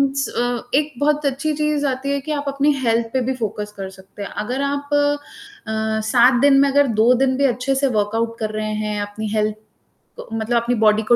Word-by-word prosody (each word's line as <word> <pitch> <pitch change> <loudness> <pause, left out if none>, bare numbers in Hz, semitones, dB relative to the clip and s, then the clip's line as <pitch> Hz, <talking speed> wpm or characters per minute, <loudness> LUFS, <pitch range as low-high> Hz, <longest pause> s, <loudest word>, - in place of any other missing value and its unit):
स 275 0 -1
अ, 245 -1 -1
एक 300 +1 0
बहुत 295 +1 +1
अच्छी 280 +3 0
चीज़ 300 -1 0
आती 265 +1 -2
है 280 - 0
कि 310 +3 -6
आप 290 -1 -2
अपनी 280 +1 +2
हेल्थ 230 -1 +2
पे 260 - +1
भी 265 - 0
फ़ोकस 210 -3 -4
कर 195 -1 -5
सकते 190 +1 -14
हैं, - - -6
अगर 245 +6 -3
आप 285 0 -2
अ, 290 - -2
7 245 +3 +5
दिन 280 -1 +6
में 280 - +4
अगर 285 +1 +3
2 235 +3 +6
दिन 260 +1 +1
भी 280 - +2
अच्छे 255 +1 0
से 275 +1 +2
वर्कआउट 225 0 -1
कर 215 -1 -2
रहे 215 0 -3
हैं, 210 -1 -2
अपनी 205 +1 -5
हेल्थ 215 -1 0 0.6
क - - -8
मतलब 225 +2 0
अपनी 240 +1 0
बॉडी 215 -1 +3
को 240 +3 +4
250 Hz, 220 wpm, -20 LUFS, 220-280 Hz, 0.6 s, दिन